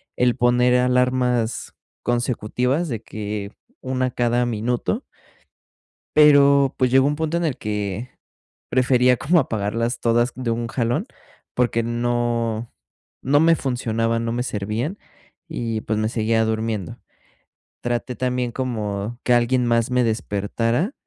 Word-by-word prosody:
el 125 -1 +2
poner 125 0 +3
alarmas 125 -2 +1 0.3
consecutivas 125 +5 0
de 115 -4 -3
que, 105 -2 -5 0.3
una 130 0 -1
cada 120 0 +1
minuto. 120 - -1 1.1
Pero, 140 -2 +6
pues 130 -2 +2
llegó 135 +1 +5
un 145 +1 0
punto 160 +1 -1
en 170 - 0
el 150 -6 -1
que, 105 +3 -4 0.6
prefería 125 0 +3
como 165 +8 +3
apagarlas 115 -1 -1
todas 120 +1 +2
de 125 -2 -2
un 115 +1 -2
jalón, 120 0 -1 0.5
porque 120 -2 +1
no 120 -1 -1 0.5
no 145 +3 +3
me 165 +1 +5
funcionaban, 115 -3 -1
no 115 - -1
me 120 +1 -1
servían 110 - -3 0.5
y, 115 -9 -3
pues 110 0 -2
me 110 - +1
seguía 110 0 +1
durmiendo. 110 -4 -3 0.8
Traté 120 +1 -2
también 125 -1 -1
como, 110 -3 -3
que 125 - +3
alguien 120 +1 +2
más 115 -1 +2
me 125 0 +3
despertara, 115 - -1
120 Hz, 130 wpm, -22 LUFS, 115-125 Hz, 1.1 s, Pero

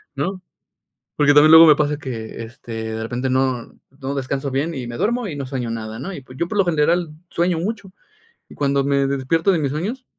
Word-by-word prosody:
¿no? 190 0 -3 0.8
,porque, 145 -1 +4
también 150 +1 +7
luego 160 +1 +10
me 150 -2 +7
pasa 150 0 0
que, 115 -5 -6
este, 115 0 -11 0.2
de 110 - -4
repente 125 +3 -2
no 130 -2 -1 0.3
no 135 +1 -3
descanso 135 +1 -3
bien 150 +5 -1
y 130 -4 -5
me 120 0 -6
duermo 235 - 0
y 155 - -5
no 140 -2 -4
sueño 130 -3 -4
nada, 110 -1 -5
¿no?, 190 +10 -5
y, 140 - -8
pues, 130 0 -14
yo 170 - -1
por 210 - -3
lo 195 - +4
general 170 0 +1 0.2
sueño 175 0 0
mucho. 200 0 -4 0.6
Y - - -13
cuando 140 -1 +1
me 140 0 +1
despierto 140 +7 +1
de 170 - +1
mis 140 -3 -1
sueños, 215 - -4
140 Hz, 220 wpm, -21 LUFS, 130-170 Hz, 0.8 s, luego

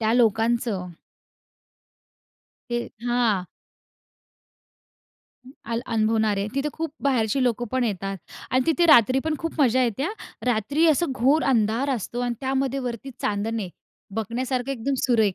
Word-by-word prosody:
त्या 220 0 +2
लोकांचं. 225 -3 +2 1.8
हे 240 - +1 0.3
हां. 235 -6 +1 2.0
हं, - - -11 0.2
आल 230 - 0
अनुभवणारे. 215 -2 +1
तिथे 275 +2 0
खूप 320 -2 -4
बाहेरची 255 -2 +1
लोकं 240 -1 0
पण 260 -1 +1
येतात 195 -2 -2 0.3
आणि 255 +1 +3
तिथे 340 +2 +3
रात्री 260 -4 +6
पण 315 -1 0
खूप 330 -2 -4
मजा 255 -1 +4
येते 240 +2 -1
हां. 375 +8 -1 0.3
रात्री 250 +8 +2
असं 315 -2 +2
घोर 270 +5 +3
अंधार 230 +5 +1
असतो 240 +2 -4
आणि 245 -1 -1
त्यामध्ये 270 0 0
वरती 240 +3 -6
चांदणे. 210 -1 -1 0.5
बघण्यासारखं 245 +4 -2
एकदम 270 +2 -2
सुरेख 220 -6 +3
240 Hz, 130 wpm, -24 LUFS, 220-270 Hz, 2.0 s, रात्री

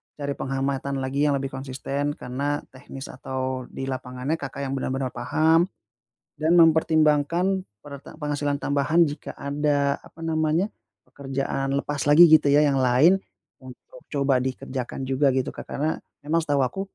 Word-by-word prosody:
cari 140 -1 -4
penghamatan 135 +1 -2
lagi 140 +3 0
yang 145 - +2
lebih 135 0 -3
konsisten 135 +2 -3
karena 140 +4 -3
teknis 135 +1 -9
atau 130 -1 -4
di - - -7
lapangannya 130 +3 -3
Kakak 140 0 -6
yang 135 - -3
bener-bener 135 -1 -2
paham 160 +8 +2 0.7
dan 160 +3 +3
mempertimbangkan 160 +2 +3 0.2
pere 140 -2 -9
penghasilan 145 -1 -3
tambahan 145 +4 +2
jika 145 -2 -6
ada, 140 0 0
apa 165 - -12
namanya, 160 +5 0 0.4
pekerjaan 135 0 -3
lepas 145 0 -2
lagi, 155 +4 +9
gitu 155 -2 +6
ya, 145 +2 +5
yang 140 -2 +2
lain 130 +10 +4 0.4
untuk 130 - -14
coba 140 -3 +1
dikerjakan 130 0 -4
juga, 135 +2 +2
gitu, 130 - -1
Kak. - - -10
Karena 155 +3 -1 0.3
memang 165 +3 +1
setahu 145 -4 +1
aku, 130 +10 -4
140 Hz, 145 wpm, -24 LUFS, 135-155 Hz, 0.7 s, lagi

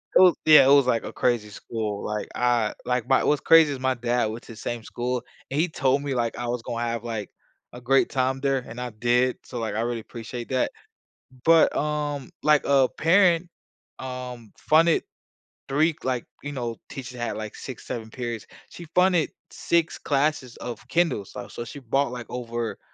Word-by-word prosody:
it - - +8
was 180 -2 +7
Yeah, 155 -3 +9
it 135 - +6
was, 140 -3 +5
like, 115 -3 +2
a - - -7
crazy 120 -4 0
school. 105 0 -4
Like, 105 0 -3
I 120 -3 +2
like, 125 -2 0
my 135 - +4
what's 150 - +2
crazy 165 -2 +6
is 135 - -6
my 130 0 +1
dad 120 0 0
went 110 +2 -7
to 115 - -11
same 115 +1 -5
school, 125 +2 -3 0.3
and 140 - 0
he 170 - +3
told 140 -4 +1
me, 140 -1 -2
like, 115 -2 -1
I 120 0 -3
was 120 -1 -2
gonna 120 0 -3
have, 115 -1 -3
like, 110 -3 -4 0.4
a 125 - -9
great 135 +3 +3
time 130 0 0
there, 135 -1 +1
and 115 - -8
I 125 -1 -4
did, 120 +3 +1
so, 125 - -6
like, 110 -1 -3
I 110 - 0
really 120 0 -1
appreciate 120 +1 -8
that. 130 -1 +1 0.7
But, 165 0 +5
um, 150 -2 -2
like, 150 -1 +4
a 135 -2 +4
parent, 175 0 +4 0.5
um, 125 -4 -7
funded 165 +1 +4 0.6
3 155 +4 +2
like, 125 -2 -1 0.2
you 145 - -5
know, 120 -4 -4
teachers 125 -2 -7
had, 120 - -2
like, 110 -1 -6
6, 130 -4 -9
7 110 -2 -5
periods. 120 -4 -5 0.2
She 170 - -10
funded 180 -3 +3 0.2
6 170 -1 0
classes 140 -3 0
of 120 -3 -7
Kindles. 165 - 0
So - - -7
so 120 - -6
she 130 - -9
bought, 135 +2 0
like, 120 -2 -6
over 120 -2 -4
125 Hz, 195 wpm, -25 LUFS, 120-145 Hz, 0.7 s, Yeah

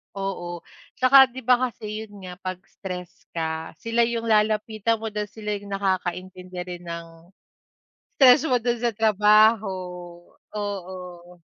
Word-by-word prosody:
Oo, 175 -3 -4 0.3
tsaka 265 +1 +7
'di 255 0 -10
ba, 250 +1 +4
kasi 215 -2 -8 0.2
yun 205 -2 -14
nga, 180 0 -9
'pag 185 0 -4
stressed 180 -2 -9
ka, 160 0 -3
sila 230 +4 +1
yung 230 -1 -2
lalapitan 215 0 +1
mo 220 0 -5
dahil 210 0 -3
sila 210 -1 -4
yung 205 - -12
nakakaintindi 185 -1 -3
rin 175 -1 -8
ng 170 0 -6 1.1
stress 265 +1 +6
mo 255 -6 +2
dun 240 +1 0
sa 235 0 -1
trabaho, 215 0 +4 0.8
oo. 180 -4 -7
205 Hz, 135 wpm, -24 LUFS, 180-225 Hz, 1.1 s, tsaka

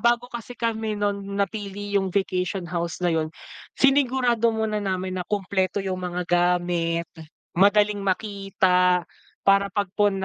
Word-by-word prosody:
bago 235 +2 +3
kasi 240 +1 -7
kami 220 -2 -1
no'n, 205 -1 -1 0.2
napili 200 0 -3
yung 195 -1 +2
vacation 185 0 -1
house 170 +1 -3
na 175 - +3
'yon, 160 -1 0 0.5
sinigurado 260 -4 +3
muna 220 -1 -1
namin 190 -2 -2
na 180 - -7
kumpleto 190 -2 -1
yung 185 -1 -2
mga 180 0 -3
gamit, 175 -1 +1 0.5
madaling 205 +2 +4
makita, 190 -2 +1 0.4
para 200 0 +4
pagpun 200 -1 0
195 Hz, 130 wpm, -24 LUFS, 180-210 Hz, 0.5 s, madaling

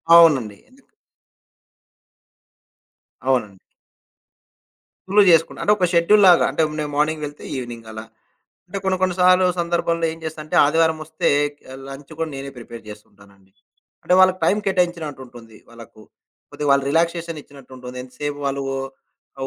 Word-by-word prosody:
అవునండి. 135 -12 +5
ఎందుకు? 260 +1 -25 2.4
అవునండి. 115 -7 0 1.5
ఫుల్లు 205 +2 +4
జేసుకుంట. 165 -1 +3
అంటే 210 - +4
ఒక 185 - +2
షెడ్యూల్‌లాగా 180 +1 +5
అంటే, - - -1 0.2
నే 150 - -1
మార్నింగ్ 150 +1 0
వెళ్తే 145 0 -10
ఈవెనింగ్ 120 -3 -7
అలా. 110 0 -8 0.6
అంటే 195 +2 -5
కొన్ని, 190 -1 +1
కొన్ని 185 -1 +1
సార్లు 185 0 +5
సందర్భాల్లో 170 -1 0
ఏం 165 - -11
చేస్తంటే, 155 -1 -6
ఆదివారమొస్తే 160 +1 0 0.3
క 130 -2 -13
లంచ్ 135 +3 -11
కూడా 160 -1 -2
నేనే 140 0 -7
ప్రిపేర్ 115 -1 -10
జేస్తుంటానండి. 100 -2 -16 0.5
అంటే 180 - +3
వాళ్ళకి 185 0 +4
టైం 200 - +3
కేటాయించినట్టు 175 -7 -1
ఉంటుంది 115 -3 -15
వాళ్ళకు. 115 -2 -14 0.5
కొద్దిగా 145 - -4
వాళ్ళ 140 0 +4
రిలాక్సేషనిచ్చినట్టు 165 -4 -3
ఉంటుంది. 125 0 -10
ఎంతసేపు 145 +3 -6
వాళ్ళు 140 0 -2
ఓ - - -3 0.6
ఆహ్, 135 - -2
150 Hz, 130 wpm, -21 LUFS, 125-170 Hz, 2.4 s, అవునండి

